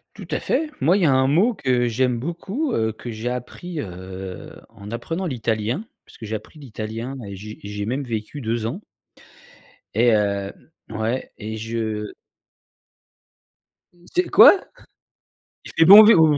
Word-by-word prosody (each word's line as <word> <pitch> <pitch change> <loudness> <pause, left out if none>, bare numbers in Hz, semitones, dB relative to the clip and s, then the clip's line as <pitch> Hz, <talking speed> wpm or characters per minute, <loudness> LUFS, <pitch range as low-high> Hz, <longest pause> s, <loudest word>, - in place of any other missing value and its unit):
Tout - - -10
à - - 0
fait. 315 -1 -1
Moi, 160 +8 +4
il 200 - 0
y 165 - +5
a 140 - +4
un 130 0 +3
mot 185 - +3
que 125 - +1
j'aime 125 +1 0
beaucoup, 195 - -3
heu, 110 0 0
que 120 +2 -8
j'ai 110 +2 -4
appris 150 +7 -5
heu, 95 -2 -8 0.2
en 105 -1 -11
apprenant 165 +10 -3
l'italien, 115 - -2 0.2
puisque - - -13
j'ai 110 0 -3
appris 150 +8 -13
l'italien 115 +1 -6
et 100 - -7
j'ai 105 +3 -9
j'ai 105 0 -4
même 130 +6 -2
vécu 115 +4 -5
2 115 -2 -2
ans 140 - -4 1.1
et 120 +3 +3
hem 100 -2 0 0.4
ouais, 110 +4 -3
et 110 0 -5
je 110 -1 -4 2.0
C'est 360 +1 +1
quoi? 390 - +8 1.1
Il - - -8
fait 165 - +6
bon 205 +4 +11
vivre? 210 -7 +7
Heu 150 -2 +3
120 Hz, 160 wpm, -22 LUFS, 110-150 Hz, 2.0 s, bon